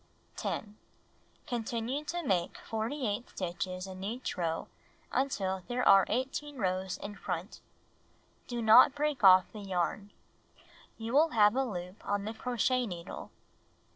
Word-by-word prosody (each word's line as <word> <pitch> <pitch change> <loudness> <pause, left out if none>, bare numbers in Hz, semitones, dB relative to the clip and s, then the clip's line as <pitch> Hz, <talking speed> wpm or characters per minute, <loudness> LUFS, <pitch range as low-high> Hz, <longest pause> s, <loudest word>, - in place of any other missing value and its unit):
10. 210 -1 -4 0.7
Continue 240 +4 -2
to 345 +3 -3
make 185 - 0
48 225 0 -3
stitches 185 0 -4
ia 190 - -8
each 230 +6 -4
row 165 -2 -2 0.4
until 195 -8 0
there 250 +1 0
are 195 -1 +7
18 270 +4 -2
rows 185 -3 -1
in 205 - -5
front. 180 0 -5 0.9
Do 240 -2 -3
not 230 +5 +8
break 290 -4 -1
off 185 -1 +8
the 215 - -8
yarn. 195 +1 -2 0.9
You 225 +1 -5
will 310 +4 +5
have 210 0 +5
a 270 - +2
loop 180 -5 -6
on 205 0 -1
the 220 - -3
crochet 250 +2 0
needle. 175 -2 -7
215 Hz, 135 wpm, -31 LUFS, 190-250 Hz, 0.9 s, not